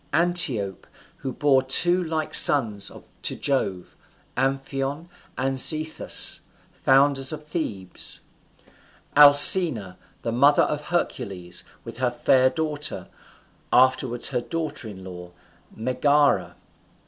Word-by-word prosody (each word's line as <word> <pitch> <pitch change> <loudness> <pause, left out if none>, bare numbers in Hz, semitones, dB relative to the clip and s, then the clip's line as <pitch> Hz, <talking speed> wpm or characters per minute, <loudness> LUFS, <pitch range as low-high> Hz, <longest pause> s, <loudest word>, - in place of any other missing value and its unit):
Antiope, 160 - 0 0.3
who 135 - -6
bore 135 0 +1
two 175 +7 +2
like 160 -2 -5
sons 110 -8 +5 0.3
to - - -3
Jove, 100 -10 -4 0.4
Amphion 135 +4 -4 0.3
and 135 +1 -2
Zethus, 155 +3 +3 0.3
founders 135 0 +1
of 155 -1 -9
Thebes. 105 - -6 1.0
Alcmena, 145 - +6 0.3
the 115 - -3
mother 140 +5 +3
of 150 0 -4
Hercules, 90 - -5 0.2
with 115 -1 -10
her 130 0 -1
fair 130 +1 +1
daughter, 150 0 -5 0.6
afterwards 130 -1 +1
her 125 -3 -3
daughter 155 -3 -6
in 95 -3 -11
law, 90 -1 -11 0.4
Megara. 140 +5 0
135 Hz, 100 wpm, -22 LUFS, 115-150 Hz, 1.0 s, Alcmena